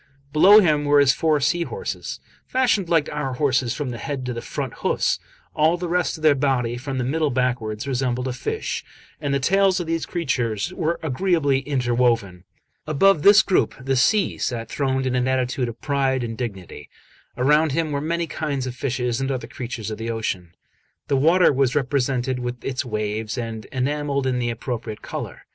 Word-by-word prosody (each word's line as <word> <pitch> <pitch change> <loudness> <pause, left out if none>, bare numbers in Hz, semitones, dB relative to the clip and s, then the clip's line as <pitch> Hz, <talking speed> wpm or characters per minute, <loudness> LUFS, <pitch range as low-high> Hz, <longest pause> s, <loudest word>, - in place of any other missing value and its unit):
Below 195 +7 +8
him 150 -5 +2
were 145 0 +5
his 140 -1 +5
four 155 -2 +1
sea 170 +5 +1
horses, 465 - -4 0.3
fashioned 235 -8 +1
like 160 -3 +3
our 145 -3 -3
horses 130 -3 +1
from 145 -4 -3
the 120 - -6
head 135 +2 -4
to 125 - -3
the 115 - -5
front - - -4
hoofs; - - +1 0.3
all 160 +3 +3
the 175 0 -4
rest 175 -1 0
of 155 - -13
their 155 -2 +6
body, 130 -4 0
from 130 +2 -5
the 125 - 0
middle 155 +4 0
backwards, 125 -3 -1
resembled 125 -1 -1
a 130 - -2
fish, 125 - -3 0.4
and 145 - -1
the 140 - +1
tails 190 +6 +3
of 175 - -3
these 165 0 -2
creatures 125 - -1
were 170 -1 -1
agreeably 150 -2 +1
inter 125 -4 0
woven. 115 -7 +1 0.4
Above 155 +3 +4
this 205 +5 +7
group 190 - +1
the 135 +1 -1
Sea 200 - +2
sat 115 -3 -3
throned 135 -2 -1
in 130 - 0
an 125 0 +1
attitude 130 -1 0
of 115 - -9
pride 135 -3 0
and 115 -1 -4
dignity; 95 - -7 0.5
around 150 +3 +3
him 160 0 0
were 140 -1 -1
many 170 +2 -1
kinds 145 -5 -3
of 130 - -4
fishes 125 -1 -2
and 135 - -1
other 130 -2 -2
creatures 115 -3 -6
of 110 - -6
the 115 +1 -4
ocean. 95 -6 -3 0.5
The 140 - +3
water 165 +4 +4
was 130 -1 +1
represented 130 -2 0
with 125 0 -5
its 130 0 -2
waves, 110 -1 -3
and 115 -2 -5
enamelled 140 +1 -1
in 130 -1 0
the 120 -1 -1
appropriate 115 -2 -5
colour. - - -6
130 Hz, 190 wpm, -23 LUFS, 120-155 Hz, 0.5 s, Below